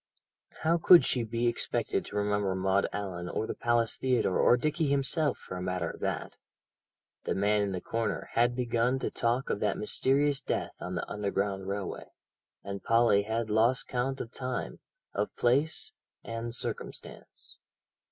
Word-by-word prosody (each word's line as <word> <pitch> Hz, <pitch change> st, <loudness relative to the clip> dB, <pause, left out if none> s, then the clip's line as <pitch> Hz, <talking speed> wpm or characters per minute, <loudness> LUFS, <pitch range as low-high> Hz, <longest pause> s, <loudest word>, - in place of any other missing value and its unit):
How 165 Hz, +2 st, +3 dB
could 175 Hz, +1 st, +8 dB
she 125 Hz, -, +1 dB
be 115 Hz, +1 st, -2 dB
expected 120 Hz, 0 st, 0 dB
to -, -, -9 dB
remember 105 Hz, -2 st, +1 dB
Maud 95 Hz, +1 st, +2 dB
Allan 90 Hz, -3 st, -4 dB
or 110 Hz, -, -2 dB
the -, -, -3 dB
Palace 120 Hz, -2 st, +1 dB
Theatre, 125 Hz, -7 st, +1 dB
or 120 Hz, -, +5 dB
Dickie 155 Hz, +4 st, 0 dB
himself 140 Hz, +2 st, +1 dB
for -, -, -9 dB
a -, -, -5 dB
matter 90 Hz, -2 st, -2 dB
of -, -, -12 dB
that? -, -, -3 dB, 0.9 s
The -, -, 0 dB
man 105 Hz, +2 st, +2 dB
in 100 Hz, -1 st, 0 dB
the 90 Hz, -1 st, -3 dB
corner 115 Hz, -3 st, -2 dB
had 120 Hz, +1 st, +3 dB
begun 120 Hz, +1 st, +1 dB
to -, -, -3 dB
talk 120 Hz, +3 st, 0 dB
of -, -, -1 dB
that 105 Hz, -1 st, 0 dB
mysterious 135 Hz, +6 st, +1 dB
death -, -, -3 dB
on 90 Hz, +1 st, -4 dB
the -, -, -3 dB
underground 100 Hz, -1 st, -2 dB
railway, 100 Hz, -1 st, -4 dB, 0.5 s
and 100 Hz, -1 st, -6 dB
Polly 115 Hz, -3 st, +4 dB
had 110 Hz, +1 st, -2 dB
lost 115 Hz, +5 st, +2 dB
count 130 Hz, +2 st, -1 dB
of 115 Hz, -, -5 dB
time, 130 Hz, -1 st, -4 dB, 0.3 s
of 105 Hz, +1 st, -2 dB
place, 135 Hz, +6 st, +1 dB, 0.3 s
and 115 Hz, +1 st, -4 dB
circumstance. -, -, -6 dB
115 Hz, 160 wpm, -30 LUFS, 100-125 Hz, 0.9 s, could